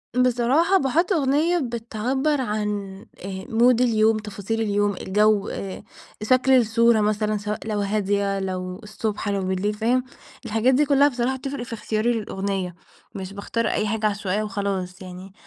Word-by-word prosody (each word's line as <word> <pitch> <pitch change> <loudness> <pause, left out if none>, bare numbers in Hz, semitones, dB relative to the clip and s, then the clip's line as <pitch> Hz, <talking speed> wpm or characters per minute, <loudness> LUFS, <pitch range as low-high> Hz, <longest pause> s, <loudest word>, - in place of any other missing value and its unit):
بصراحة 250 +9 +3
باحط 330 +6 +1
أغنية 310 +3 +2
بتعبر 250 +4 -1
عن 210 -3 -1 0.5
آآ 190 0 -6
mood 240 0 +3
اليوم، 220 -2 +3
تفاصيل 210 +1 -4
اليوم، 205 -1 +1
الجو، 210 +1 +2
آآ 190 -1 -6 0.4
شكل 255 +3 +3
الصورة 230 -2 +4
مثلًا 210 0 0
سواء 210 +1 -4
لو 210 -2 -1
هادية، 200 -1 0
لو 185 -1 -4
الصبح 210 0 -3
لو 200 -1 0
بالليل 190 +3 -1
فاهم؟ 235 +4 +1 0.4
الحاجات 225 +4 +2
دي 295 +3 +3
كلها 280 0 +5
بصراحة 255 0 -1
بتفرق 275 -2 -5
في 235 - -8
اختيار 215 0 -2
الأغنية، 195 -5 -2 0.4
مش 195 0 -6
باختار 225 +3 -2
أي 215 - 0
حاجة 215 +1 -1
عشوائية 205 0 -1
وخلاص، 195 -3 -3
يعني 185 +1 -10
215 Hz, 145 wpm, -23 LUFS, 200-245 Hz, 0.5 s, كلها